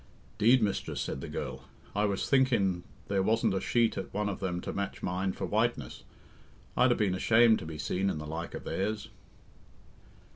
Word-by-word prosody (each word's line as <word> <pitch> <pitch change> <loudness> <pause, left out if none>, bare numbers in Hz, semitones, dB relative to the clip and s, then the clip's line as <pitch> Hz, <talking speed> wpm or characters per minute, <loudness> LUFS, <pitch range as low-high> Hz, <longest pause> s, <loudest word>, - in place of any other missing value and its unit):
"'Deed, 115 +3 +5
mistress," 100 -2 -1
said 65 - -3
the - - -5
girl, 65 +2 -5 0.3
"I 105 +1 +2
was 100 -2 -1
thinkin' 115 -10 +3 0.3
there 100 -1 +1
wasn't 110 +1 +2
a 95 - -1
sheet 115 -1 +2
at - - -6
one 105 0 -1
of 100 - -4
them 90 -2 -2
to - - -5
match 100 0 -4
mine 95 +2 -1
for - - -4
whiteness. - - -1 0.7
I'd 125 0 +4
'a - - +4
been 105 -4 +1
ashamed 110 +4 +5
to 80 - -7
be 80 -1 -6
seen 95 +5 0
in 80 - -2
the 75 - -6
like 80 +2 -5
of - - -6
theirs." 105 +2 -2
100 Hz, 190 wpm, -30 LUFS, 90-110 Hz, 0.7 s, Deed